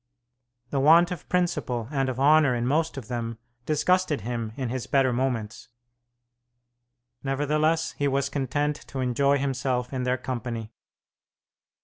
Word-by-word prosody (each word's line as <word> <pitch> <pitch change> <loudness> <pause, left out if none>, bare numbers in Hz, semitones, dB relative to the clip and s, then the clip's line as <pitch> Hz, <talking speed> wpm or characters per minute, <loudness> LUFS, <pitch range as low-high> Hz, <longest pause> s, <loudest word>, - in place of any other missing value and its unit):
The 140 - 0
want 165 +5 +6
of 180 - -7
principle 145 -10 0
and 135 -3 0
of 130 0 -4
honour 145 -2 +5
in 120 0 -1
most 155 +4 0
of 125 -5 -7
them 115 -2 -4 0.3
disgusted 155 -1 +2
him 115 0 -3
in 130 -3 -3
his 130 0 -4
better 135 -2 +3
moments; 120 -4 -2 1.5
nevertheless 150 +4 +1
he 145 - -1
was 140 0 +1
content 145 +2 -1
to 135 - -6
enjoy 140 +3 +2
himself 130 -2 -1
in 130 - -2
their 125 0 0
company. 120 -3 -5
135 Hz, 135 wpm, -26 LUFS, 125-150 Hz, 1.5 s, want